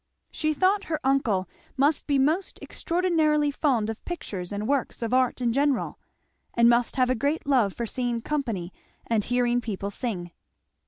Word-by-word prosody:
She 310 -1 -1
thought 390 +6 +2
her 315 -2 -2
uncle 235 -9 +1 0.3
must 285 +3 +2
be 285 -2 +2
most 310 +8 +1
extraordinarily 315 -4 +1
fond 260 -7 +1
of 225 -1 -5
pictures 195 - -5
and 205 +1 -3
works 270 -3 -1
of 230 +1 -2
art 255 0 +2
in 235 -2 +1
general, 280 0 0 0.6
and 235 0 +5
must 235 0 +3
have 255 -1 +3
a - - +4
great 285 +6 -1
love 250 -9 +3
for 235 - -3
seeing 240 0 -1
company 230 -10 -3 0.3
and 225 -3 +1
hearing 245 +1 +1
people 200 -3 -4
sing. 190 -7 -4
255 Hz, 165 wpm, -26 LUFS, 225-290 Hz, 0.6 s, and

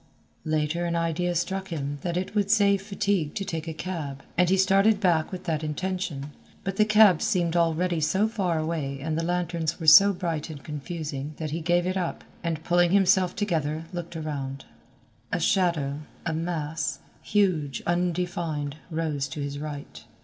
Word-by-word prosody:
Later 155 +2 0
an 170 0 -1
idea 170 +1 0
struck 190 +3 -1
him 145 -4 -4
that 170 +2 -2
it 185 +2 -3
would 205 -2 +1
save 200 -2 +4
fatigue 195 -5 -1
to 195 - -2
take 165 -2 -4
a - - -2
cab, 155 -6 -5
and 180 +1 +3
he 190 - +4
started 195 +3 +4
back 170 -6 +2
with 185 -1 -6
that 160 -3 -1
intention, 155 -3 -3 0.3
but 195 -1 -3
the 215 - +5
cabs 215 -5 +6
seemed 175 -4 +1
already 170 +1 +2
so 190 +7 +2
far 195 -7 -1
away 155 -4 -2
and 155 +3 -2
the 165 - 0
lanterns 170 -2 -1
were 165 - -5
so 195 +6 +9
bright 170 -5 -3
and 145 -3 -8
confusing 150 -1 -5
that 155 -2 -4
he 165 +2 -2
gave 175 +2 +2
it 185 +1 -1
up, 180 -2 -3 0.2
and 165 -2 -2
pulling 175 +1 +3
himself 190 -1 +3
together 160 -6 -1
looked 175 -1 -5
around. 140 -4 -4 0.7
A - - 0
shadow, 160 -7 +1 0.3
a 165 - 0
mass, 160 -1 -2 0.2
huge, 180 -9 +1
undefined, 175 -4 -1
rose 155 -4 -1
to 135 +3 -7
his 145 0 -4
right. 145 -1 -7
170 Hz, 170 wpm, -26 LUFS, 155-185 Hz, 0.7 s, so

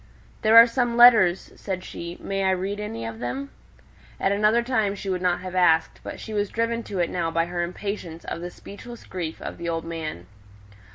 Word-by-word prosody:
"There 220 +1 +6
are 230 - +12
some 240 0 -1
letters," 220 -7 +6
said 185 -2 -5
she: 170 -1 -7
"may 195 0 -2
I 190 - +3
read 190 +2 -1
any 115 - -5
of 115 0 -6
them?" 270 - -4 0.7
At 195 - +1
another 215 +3 +3
time 220 -5 0
she 195 -1 -4
would 180 -1 -2
not 180 -1 +1
have 185 0 -7
asked; 165 -3 +3
but - - -8
she 220 - -7
was 205 -1 0
driven 230 +1 -1
to 200 - -5
it 175 -2 +1
now 170 -2 -1
by 165 +1 +1
her 175 0 -3
impatience 175 -1 -5
of 170 - -5
the 175 - -5
speechless 235 +6 -11
grief 170 -4 -5
of - - -7
the 170 - -3
old 165 0 -3
man. 160 - -5
185 Hz, 210 wpm, -24 LUFS, 170-215 Hz, 0.7 s, are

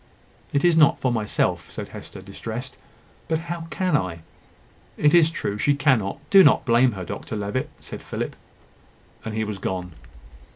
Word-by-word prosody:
"It 140 +4 +1
is 175 -2 +5
not 155 -3 +5
for 130 - +1
myself," 110 -3 -1
said - - -6
Hester, - - -10
distressed: - - -6 0.5
"but 160 +1 +1
how 165 0 -6
can 180 +2 0
I?" 90 - -1 0.8
"It 150 0 +3
is 165 -2 +6
true; 105 -10 -3
she 145 +5 +3
cannot. 130 -8 +2
Do 195 -1 +9
not 145 - +4
blame 120 0 +4
her, 95 -3 -6
Dr 110 - -6
Levitt," 105 +5 -2
said - - -9
Philip; - - -4 0.9
and 110 -1 -5
he 110 - 0
was 105 -2 -5
gone. 90 -1 -3
130 Hz, 165 wpm, -24 LUFS, 105-160 Hz, 0.9 s, Do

